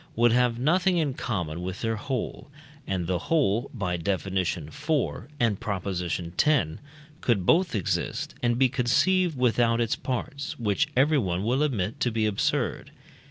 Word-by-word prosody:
would 120 Hz, +1 st, +4 dB
have 125 Hz, -1 st, +2 dB
nothing 180 Hz, +8 st, +2 dB
in 150 Hz, -5 st, +1 dB
common 90 Hz, -10 st, -3 dB
with 95 Hz, +1 st, -5 dB
their 115 Hz, 0 st, 0 dB
whole, 130 Hz, +4 st, -4 dB, 0.4 s
and 95 Hz, -2 st, -1 dB
the 90 Hz, 0 st, 0 dB
whole 130 Hz, -7 st, +2 dB
(by 90 Hz, -7 st, -2 dB
Def. 95 Hz, +4 st, -1 dB
iv. 95 Hz, -2 st, 0 dB, 0.8 s
and 115 Hz, -5 st, +1 dB
Prop. 100 Hz, -4 st, -3 dB
x.) 95 Hz, -2 st, -1 dB, 1.2 s
could 105 Hz, -7 st, +1 dB
both 175 Hz, -, +3 dB
exist 100 Hz, -, -2 dB
and 120 Hz, -1 st, +1 dB
be 130 Hz, +1 st, +5 dB
conceived 150 Hz, +7 st, +2 dB
without 120 Hz, -1 st, +2 dB
its 115 Hz, -1 st, +1 dB
parts, 140 Hz, +2 st, -4 dB
which 105 Hz, -4 st, +1 dB
everyone 130 Hz, -, +2 dB
will 125 Hz, +6 st, +1 dB
admit 115 Hz, -9 st, -1 dB
to 125 Hz, -, +2 dB
be 110 Hz, -1 st, 0 dB
absurd. 105 Hz, -2 st, 0 dB
115 Hz, 150 wpm, -26 LUFS, 95-135 Hz, 1.2 s, be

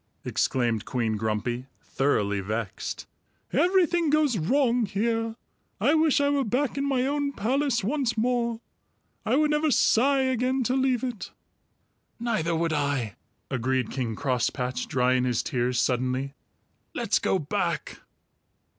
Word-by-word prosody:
exclaimed 120 Hz, -4 st, 0 dB
Queen 115 Hz, -3 st, -1 dB
Grumpy, 110 Hz, +4 st, -2 dB, 0.2 s
thoroughly 105 Hz, -7 st, 0 dB
vexed. 105 Hz, 0 st, -4 dB, 0.5 s
"Everything 345 Hz, +1 st, +3 dB
goes 300 Hz, -4 st, +3 dB
wrong 240 Hz, -, +2 dB
here. 225 Hz, +2 st, -1 dB, 0.4 s
I 290 Hz, -, +3 dB
wish 315 Hz, -2 st, +3 dB
I 285 Hz, -, +2 dB
were 285 Hz, -1 st, +2 dB
back 255 Hz, +4 st, 0 dB
in 275 Hz, -, -1 dB
my 255 Hz, -2 st, +1 dB
own 285 Hz, 0 st, -1 dB
palace 255 Hz, +1 st, 0 dB
once 240 Hz, 0 st, 0 dB
more! 235 Hz, 0 st, 0 dB, 0.7 s
I -, -, +3 dB
would 300 Hz, +1 st, +3 dB
never 300 Hz, +1 st, +2 dB
sigh 270 Hz, +2 st, +3 dB
again 260 Hz, 0 st, +1 dB
to 250 Hz, -, 0 dB
leave 260 Hz, -2 st, +1 dB
it." 245 Hz, -6 st, -4 dB, 0.9 s
"Neither 215 Hz, -9 st, 0 dB
would 165 Hz, 0 st, 0 dB
I," 140 Hz, -7 st, -1 dB, 0.4 s
agreed 130 Hz, 0 st, 0 dB
King 120 Hz, -5 st, -2 dB
Crosspatch, 125 Hz, 0 st, -1 dB
drying 125 Hz, 0 st, +2 dB
his 125 Hz, -2 st, 0 dB
tears 125 Hz, 0 st, 0 dB
suddenly. 130 Hz, +2 st, 0 dB, 0.6 s
"Let's -, -, +1 dB
go -, -, +1 dB
back!" -, -, -2 dB
225 Hz, 130 wpm, -26 LUFS, -, 0.9 s, Everything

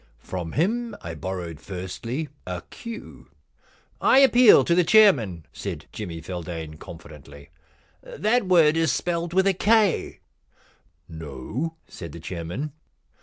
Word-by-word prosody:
From 90 Hz, -3 st, -5 dB
him 230 Hz, +9 st, 0 dB
I 85 Hz, -, -6 dB
borrowed, 85 Hz, 0 st, -5 dB
firstly, 110 Hz, -, -5 dB, 0.2 s
a 90 Hz, -2 st, -4 dB
queue.' 230 Hz, -1 st, -9 dB, 0.4 s
* -, -, -34 dB
I -, -, +5 dB
appeal 250 Hz, -4 st, +7 dB
to 170 Hz, -, +2 dB
the 180 Hz, +1 st, +4 dB
chairman,' 135 Hz, -, +4 dB
said -, -, -6 dB
Jimmy 85 Hz, -2 st, -6 dB
Feldane 80 Hz, -2 st, -6 dB
confidently. 70 Hz, -3 st, -12 dB, 0.3 s
* -, -, -36 dB
That 215 Hz, 0 st, 0 dB
word 165 Hz, -4 st, +5 dB
is 165 Hz, -4 st, +2 dB
spelled 170 Hz, +4 st, -2 dB
with 190 Hz, +2 st, +3 dB
a 195 Hz, -, +4 dB
K.' 210 Hz, 0 st, +2 dB, 0.5 s
* -, -, -35 dB, 0.2 s
No,' 80 Hz, -, -5 dB
said 85 Hz, -4 st, -9 dB
the 85 Hz, -, -8 dB
chairman. 85 Hz, -, -5 dB
110 Hz, 135 wpm, -24 LUFS, -, 0.5 s, appeal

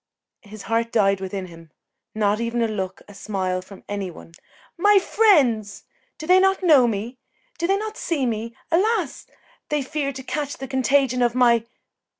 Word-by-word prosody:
His 210 Hz, -2 st, -11 dB
heart 230 Hz, +1 st, -1 dB
died 195 Hz, -3 st, +2 dB
within 190 Hz, 0 st, -4 dB
him 165 Hz, -2 st, -14 dB, 0.5 s
not 210 Hz, 0 st, +1 dB
even 235 Hz, 0 st, -1 dB
a -, -, +1 dB
look, 190 Hz, -3 st, -5 dB
a 205 Hz, -, -13 dB
smile 190 Hz, -3 st, -3 dB
from 190 Hz, +1 st, -14 dB
any 200 Hz, -2 st, -4 dB
one. 165 Hz, -, -13 dB, 0.4 s
"My 410 Hz, +4 st, +4 dB
friends! 270 Hz, -, +2 dB, 0.3 s
Do 310 Hz, -, -7 dB
they 365 Hz, +3 st, +5 dB
not 385 Hz, 0 st, +2 dB
know 290 Hz, -8 st, +6 dB
me? 230 Hz, +3 st, -4 dB, 0.4 s
Do 340 Hz, -, 0 dB
they 390 Hz, +1 st, +2 dB
not 430 Hz, +1 st, -5 dB
see 295 Hz, -6 st, -1 dB
me? 230 Hz, 0 st, -3 dB, 0.2 s
Alas! 375 Hz, -, 0 dB, 0.4 s
they 295 Hz, -2 st, 0 dB
fear 280 Hz, 0 st, -3 dB
to 265 Hz, -1 st, -9 dB
catch 290 Hz, +1 st, -4 dB
the 270 Hz, -, -7 dB
contagion 265 Hz, -1 st, +1 dB
of 240 Hz, 0 st, +2 dB
my 235 Hz, -2 st, +3 dB
240 Hz, 170 wpm, -22 LUFS, 205-300 Hz, 0.5 s, know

